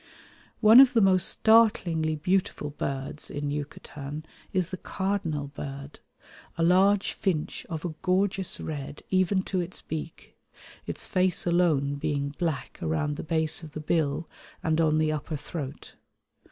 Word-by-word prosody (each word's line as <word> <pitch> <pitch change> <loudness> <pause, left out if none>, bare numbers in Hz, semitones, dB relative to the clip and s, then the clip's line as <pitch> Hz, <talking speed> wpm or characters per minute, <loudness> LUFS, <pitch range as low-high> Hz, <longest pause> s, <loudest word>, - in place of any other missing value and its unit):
One 220 +3 +9
of 265 -2 +8
the 235 - +4
most 190 -3 +4
startlingly 185 -8 +3
beautiful 155 -2 -1
birds 140 0 -4
in 145 0 -3
Yucatan 145 0 -6 0.3
is 185 -3 0
the 185 - -4
cardinal 180 -8 -2
bird, 140 0 -8 0.6
a 165 - +1
large 190 +3 +4
finch 170 -6 -2
of 165 0 -4
a 170 - -3
gorgeous 190 0 0
red 145 -1 -6
even 185 0 +2
to 185 -2 -1
its 175 +1 -6
beak, 160 0 -7 0.5
its - - -3
face 185 -1 +1
alone 160 -5 +2
being 140 0 -1
black 160 -6 -3
around 155 -2 -1
the - - -6
base 160 0 +1
of 155 -3 -11
the - - -5
bill 155 0 0 0.4
and 160 0 +2
on 155 -1 +3
the 155 0 +2
upper 155 +1 -3
throat. 145 -1 -7
160 Hz, 145 wpm, -27 LUFS, 150-185 Hz, 0.6 s, One